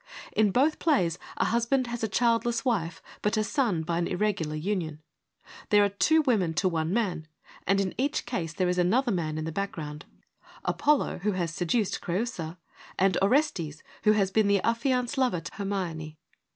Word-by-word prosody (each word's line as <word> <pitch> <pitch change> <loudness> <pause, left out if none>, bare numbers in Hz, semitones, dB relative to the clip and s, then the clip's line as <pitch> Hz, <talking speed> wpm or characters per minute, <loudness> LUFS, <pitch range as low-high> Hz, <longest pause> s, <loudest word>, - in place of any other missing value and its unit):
In 215 -1 +3
both 275 +9 +2
plays 180 - +2 0.2
a - - +2
husband 235 +3 +1
has 235 -1 -5
a - - +2
childless 235 +2 +1
wife, 175 -9 -1 0.2
but 210 +2 +1
a 215 - +2
son 215 - 0
by 170 +1 -1
an 175 - 0
irregular 180 -5 -1
union. 160 -2 -2 0.7
There 205 -1 +6
are - - +1
two 315 +11 +3
women 200 - +1
to 185 - +2
one 165 -2 -1
man, 185 -8 -1 0.4
and 195 +2 +3
in 190 -2 -1
each 285 +3 0
case 180 -10 -3
there 180 +2 0
is 180 0 +1
another 235 +8 +2
man 160 -5 -1
in 155 - -3
the 160 - -3
background, 155 -5 -5 0.6
Apollo 295 -1 +1
who 205 +3 0
has 170 -3 -2
seduced 185 +5 0
Creiisa, 175 -3 -3 0.4
and 190 0 +3
Orestes 195 - +1 0.2
who 215 - +5
has 195 -3 +1
been 215 0 +3
the 200 0 +4
affi 230 +3 +1
anced 250 0 0
lover 250 -9 +2
to - - -9
Hermione. 175 -6 -4
195 Hz, 180 wpm, -28 LUFS, 170-235 Hz, 0.7 s, There